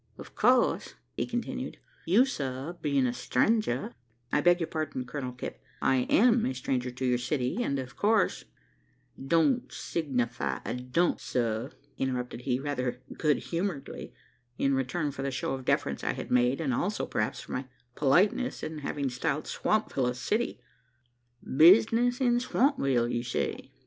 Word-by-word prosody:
"Of - - -11
course," - - +2 0.2
continued - - -3 0.3
he, 170 - 0
"you, 240 +6 +7
sir, 140 - -4
bein' 140 -3 +2
a 125 - +1
strenger 140 - +1 0.2
" 120 +1 -34
"I 150 - +4
beg 175 +2 +5
your 165 - 0
pardon, 155 -6 -3
Colonel 125 0 -4
Kipp: 125 - -7 0.2
I 130 -2 +2
am 235 +1 +5
a 130 - -1
stranger 130 0 -1
to 130 +1 -4
your 125 -1 +2
city, 130 - -1
and 140 -12 0
of 130 0 -6
course 215 0 +2 0.4
" 135 - -15
"Don't 235 - +3
signify 125 -8 -2
a - - -2
dump, 125 +8 0
sir," 115 +1 -2 0.3
interrupted 125 -2 -2
he, 125 0 0
rather 135 -3 -2 0.2
good 150 -2 +2
humouredly, 170 -4 -3 0.5
in 140 - +2
return 135 +4 -1
for 135 - -7
the 140 - -1
show 135 0 -2
of 130 -1 -5
deference - - 0
I - - 0
had - - -7
made, 125 +3 +3
as 145 -5 0
also, 200 - -1
perhaps 105 - -2
for - - -11
my 130 - -3 0.3
politeness 180 - +2
in 155 -1 -4
having 140 -1 -2
styled 140 +4 -1
Swampville 210 -12 0
a 125 - -3
city. 215 - -1 0.9
"Business 225 - +5
in 240 -2 +3
Swampville, 245 - +2
you 120 0 -1
say?" 120 - -3
135 Hz, 160 wpm, -29 LUFS, 125-175 Hz, 0.9 s, you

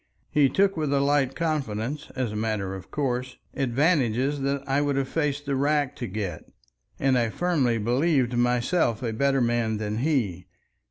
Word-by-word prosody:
He 145 -2 +4
took 195 +4 +2
with 155 -3 -1
a 140 - +3
light 140 -1 +2
confidence, 145 -3 -2
as 125 -4 -1
a - - -6
matter 105 -3 -2
of 95 -1 -9
course, 130 -3 -2 0.2
advantages 135 0 +1
that 140 0 -2
I 135 +1 +2
would 145 -1 0
have 135 -1 0
faced 145 -1 -1
the 140 -1 -1
rack 145 0 +1
to 120 - -4
get, 95 -5 -5 0.5
and 135 -1 +2
I 115 -1 +1
firmly 140 -6 +1
believed 125 +3 +1
myself 120 +1 +1
a 115 -2 -1
better 135 +3 +2
man 115 -2 +1
than 105 +1 -3
he. 115 - 0
130 Hz, 170 wpm, -26 LUFS, 115-145 Hz, 0.5 s, He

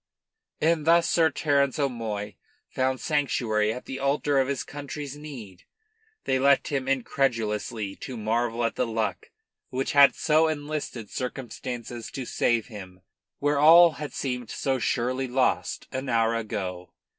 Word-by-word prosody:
And 160 -1 +2
thus 170 0 +5
Sir 165 -2 +3
Terence 140 -2 +1
O'Moy 110 -7 -2 0.4
found 130 0 0
sanctuary 120 -8 0
at 125 - -7
the 135 - -6
altar 140 +1 +1
of 130 - +2
his 135 -2 -2
country's 145 0 -7
need. 125 -11 -10 0.6
They 130 - +1
left 140 +1 +3
him 135 -2 -2
incredulously 115 -6 -1
to 130 - -7
marvel 115 +2 -1
at 115 - 0
the 125 - -1
luck 110 -1 -2 0.4
which 130 +1 -2
had 140 -1 +7
so 160 +1 +3
enlisted 145 -7 -4
circumstances 125 -2 -5
to 130 - -6
save 115 -1 +1
him 95 -4 -11 0.4
where 145 0 +1
all 165 +3 +8
had 150 -1 -7
seemed 125 -4 -3
so 135 -1 -1
surely 130 +2 -1
lost 125 +1 0
an 130 +1 -4
hour 115 -1 +2
ago. 95 -5 -4
130 Hz, 145 wpm, -26 LUFS, 115-145 Hz, 0.6 s, all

